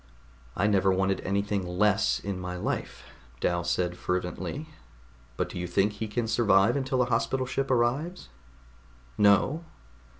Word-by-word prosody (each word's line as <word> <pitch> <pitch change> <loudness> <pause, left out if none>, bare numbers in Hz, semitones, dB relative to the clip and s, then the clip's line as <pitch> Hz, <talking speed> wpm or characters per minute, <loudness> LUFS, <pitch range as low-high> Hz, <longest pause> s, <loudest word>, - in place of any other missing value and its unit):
"I 100 - +1
never 95 -2 +3
wanted 95 +1 +1
anything 100 0 -1
less 100 +4 +2
in 100 -2 -4
my 90 0 -5
life," - - -4 0.4
Dal 85 0 0
said 90 +1 0
fervently. 90 - -3 0.7
"But - - 0
do - - -6
you 90 - -3
think 95 +4 +2
he 110 +1 -4
can 115 +2 -2
survive 110 -1 +4
until 130 -2 +1
a - - 0
Hospital 125 +2 0
Ship 135 +1 -2
arrives?" 135 +9 0 0.9
"No." 105 +10 +3
100 Hz, 140 wpm, -28 LUFS, 95-120 Hz, 0.9 s, survive